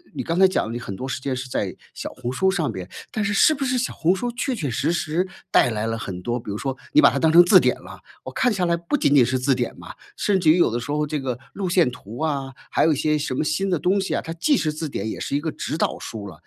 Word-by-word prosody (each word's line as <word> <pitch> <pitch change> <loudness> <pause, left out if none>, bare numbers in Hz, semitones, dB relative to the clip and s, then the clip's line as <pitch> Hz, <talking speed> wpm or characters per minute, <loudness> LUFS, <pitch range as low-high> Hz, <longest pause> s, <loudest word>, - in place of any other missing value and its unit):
你 - - -2
刚 165 +1 -2
才 190 - +8
讲 185 - -1
了 - - -5
你 120 - -4
很 100 -4 -6
多 130 +7 -5
时 - - -3
间 130 -1 -2
是 130 +1 -6
在 - - -2 0.2
小 - - -5
红 125 -1 -5
书 190 +9 +2
上 160 -9 -1
面， 95 -3 -7 0.2
但 215 - -1
是 205 - 0
是 310 +10 +5
不 275 -1 -2
是 255 0 +1
小 245 - -1
红 175 +3 +2
书 240 +4 -3
确 255 +2 -2
确 155 - -3
实 120 +7 0
实 170 +3 -1 0.2
带 125 - +4
来 110 0 -2
了 115 - -2
很 95 -4 -6
多 120 +6 -2
比 110 - -7
如 100 - -3
说 135 +2 -3
你 305 - +6
把 - - +7
它 - - -2
当 160 -1 +3
成 175 +1 +9
字 175 - +7
典 - - +2
了， - - -11 0.2
我 - - -7
看 250 -4 +1
下 185 -3 0
来 170 0 +1
不 170 +11 -2
仅 145 - +2
仅 125 - +6
是 130 +2 0
字 135 +1 +2
典 125 -2 -3
嘛， - - -10 0.2
甚 200 -2 +1
至 160 -4 +5
于 165 - +4
有 175 - +4
的 120 - -2
时 130 +5 -5
候 150 0 0
这 150 0 -2
个 130 -3 -3 0.2
路 195 -2 -3
线 175 -5 +3
图 120 -2 -10
啊， 140 -4 -2 0.2
还 - - +2
有 160 - +4
一 - - -1
些 150 +2 +1
什 145 -3 -3
么 130 - 0
新 190 +6 -1
的 175 - +1
东 190 +6 +2
西 195 - -2
啊， - - 0
它 165 - -6
既 225 - +2
是 155 - 0
字 155 +1 -4
典， 110 -5 -4
也 - - -5
是 - - -3
一 145 - 0
个 160 0 -2
指 155 - -4
导 - - 0
书 105 -3 -7
了。 80 -5 -12
150 Hz, 340 characters per minute, -23 LUFS, 125-180 Hz, 0.2 s, 成